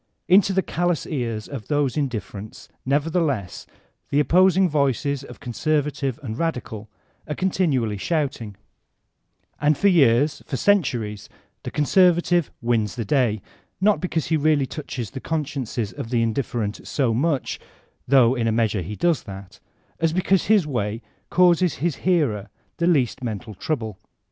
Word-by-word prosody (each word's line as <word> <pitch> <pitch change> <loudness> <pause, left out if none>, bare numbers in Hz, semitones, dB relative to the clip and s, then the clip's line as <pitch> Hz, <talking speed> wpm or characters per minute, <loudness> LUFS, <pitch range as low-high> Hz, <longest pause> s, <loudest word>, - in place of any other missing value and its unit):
Into 190 +2 +5
the 190 0 +1
callous 175 -1 -1
ears 115 -7 -3
of 135 -7 -7
these 145 -4 0
indifferents, 110 -7 -5 0.2
nevertheless, 145 - -1 0.4
the 140 - +2
op 150 - 0
posing 185 +1 +5
voices 140 -2 0
of - - -11
conservative 140 0 -1
and 110 -3 -5
radical 120 -10 -3 0.4
are 150 - -2
continually 140 - 0
shouting; 130 - -2 1.0
and 150 0 +2
for 200 - +4
years, 145 -4 +3
for 135 - -2
centuries, 120 - 0 0.3
the - - -5
conservative 175 +1 +3
wins 115 -3 0
the 115 -3 -3
day, 110 -4 +1 0.4
not 205 +2 +3
because 170 -4 -1
he 160 - +3
really 150 -2 +2
touches 130 -6 -6
the - - -6
consciences 140 -8 -3
of 115 - -6
the 120 -2 +1
indifferent 115 -2 -2
so 130 -6 +1
much 140 +3 -1 0.5
(though 130 -2 +5
in 120 -3 -1
a - - +2
measure 110 -3 +1
he 95 +5 -6
does 170 +1 +1
that) 95 -2 -10 0.4
as 165 -1 +1
because 185 +1 +2
his 210 -6 +4
way 115 -5 -3 0.3
causes 180 -2 +4
his 165 +1 -2
hearer 140 - 0 0.3
the 170 - +1
least 135 -7 +1
men 110 -4 -2
tal 110 0 -11
trouble. 110 - -4
140 Hz, 150 wpm, -23 LUFS, 115-165 Hz, 1.0 s, Into